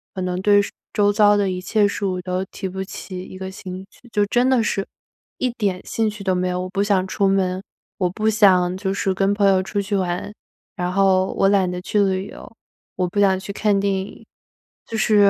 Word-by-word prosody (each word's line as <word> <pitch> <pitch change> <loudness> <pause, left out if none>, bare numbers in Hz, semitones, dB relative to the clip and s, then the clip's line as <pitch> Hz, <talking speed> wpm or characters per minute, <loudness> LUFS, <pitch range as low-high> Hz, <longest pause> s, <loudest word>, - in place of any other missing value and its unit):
可 185 - -3
能 180 0 -2
对 205 +1 +5 0.3
周 205 0 +3
遭 205 0 +5
的 200 -2 +1
一 180 0 -4
切 210 +2 +2
事 205 - -4
物 185 -2 -1
都 180 +1 -2
提 190 - -6
不 190 +1 -4
起 185 -1 -7
一 185 - -10
个 190 0 -6
兴 190 0 -8
趣。 245 - -19
就 205 -2 +2
真 245 +4 +2
的 255 -3 +3
是 195 -2 -1 0.5
一 255 - 0
点 200 -6 -1
兴 225 -1 0
趣 210 -1 -8
都 190 -1 +1
没 180 0 0
有， 180 0 -1
我 185 - -5
不 195 +1 0
想 200 -3 +2
出 195 +1 +1
门， 190 -1 +1 0.4
我 180 - +2
不 215 +4 -2
想 185 -4 +4
就 190 0 -2
是 195 -1 0
跟 195 +1 +1
朋 205 -1 +3
友 190 -1 +4
出 195 +2 -3
去 200 +1 -2
玩。 185 +2 -2 0.4
然 180 0 -2
后 190 -1 +3
我 195 - +4
懒 195 -2 +3
得 180 0 -4
去 205 +3 0
旅 190 -1 +1
游， - - -11 0.4
我 180 -1 0
不 190 +4 -3
想 190 -2 +4
去 195 +1 -7
看 205 -1 +1
电 200 0 +1
影， 190 +1 -5 0.6
就 225 - -4
是 210 -2 +5
195 Hz, 245 characters per minute, -21 LUFS, 185-205 Hz, 0.6 s, 对